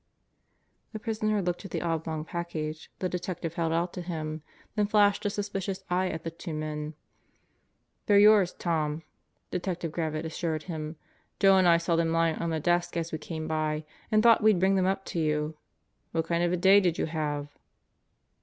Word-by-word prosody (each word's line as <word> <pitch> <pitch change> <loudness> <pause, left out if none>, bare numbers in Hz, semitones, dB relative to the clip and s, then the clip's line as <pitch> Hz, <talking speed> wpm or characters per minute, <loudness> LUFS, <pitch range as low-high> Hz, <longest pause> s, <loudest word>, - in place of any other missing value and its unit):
The 215 - -4
prisoner 215 -2 0
looked 175 +1 -2
at 195 - -7
the - - -3
oblong 160 -2 -2
package 160 -3 -4
the 185 - -1
detective 180 -2 -4
held 165 -1 -1
out 170 +2 0
to 180 - -5
him, 155 -3 -4 0.3
then 210 -2 +1
flashed 205 -1 +3
a - - +1
suspicious 195 -2 -3
eye 185 +1 +2
at 160 -1 -5
the 165 - -4
two 165 -1 -6
men. 155 0 -4 1.1
"They're 205 - +6
yours, 205 -3 +6
Tom," 160 -2 -1 0.5
Detective 180 -2 -3
Gravitt 155 -1 -2
assured 160 -1 -2
him. 155 -2 -5 0.4
"Joe 195 -1 +6
and 185 -1 +5
I 170 -1 +7
saw 170 0 0
them 165 0 +1
lying 165 -1 +2
on 170 - -2
the 160 -1 -1
desk 175 +2 +1
as 165 0 -2
we 160 - -3
came 160 0 -5
by 155 -1 -1 0.3
and 215 0 +4
thought 230 -1 +6
we'd 215 -4 +5
bring 190 +2 +3
them 190 -1 +2
up 195 0 -1
to 170 - -3
you. 150 0 0 0.6
What 165 -1 0
kind 170 +1 0
of 175 - +2
a 180 - +1
day 190 +3 +7
did 175 -4 +1
you - - 0
have?" 150 -2 -3
170 Hz, 190 wpm, -28 LUFS, 160-190 Hz, 1.1 s, I